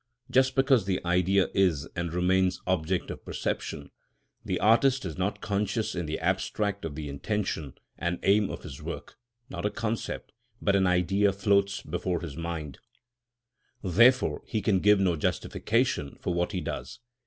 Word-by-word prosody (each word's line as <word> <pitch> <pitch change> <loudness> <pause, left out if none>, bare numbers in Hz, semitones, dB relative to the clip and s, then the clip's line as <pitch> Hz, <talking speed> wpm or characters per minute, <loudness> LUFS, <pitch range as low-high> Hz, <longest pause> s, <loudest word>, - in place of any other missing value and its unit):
Just 130 0 +3
because 135 -6 +3
the 95 -1 +1
Idea 90 +2 +3
is 90 -8 +2
and 85 -1 -2
remains 90 +1 +2
object 90 0 0
of - - -8
perception, - - -4 0.5
the - - -2
artist 125 +3 +4
is 85 - -4
not 95 +2 -2
conscious 105 +2 -1
in 85 -3 -3
the 75 - -2
abstract 95 +3 -1
of 75 -3 -5
the 75 -1 -5
intention 80 -1 -3 0.2
and 85 +1 -1
aim 100 +1 +4
of - - -7
his 65 - -9
work; - - -7 0.3
not 85 -2 -5
a 105 - +2
concept, 115 +1 -4 0.3
but 100 - +2
an 95 -1 +3
Idea 95 +3 +3
floats 100 0 +1
before 90 -1 -2
his 80 -6 -6
mind; 80 -4 -5 1.0
therefore 120 +8 +4
he 110 - -1
can 100 -2 +2
give 105 +1 +5
no 90 -3 +2
justification 105 - -1
of 90 - +1
what 85 0 0
he 95 -3 -2
does. - - -5
95 Hz, 160 wpm, -28 LUFS, 85-105 Hz, 1.0 s, give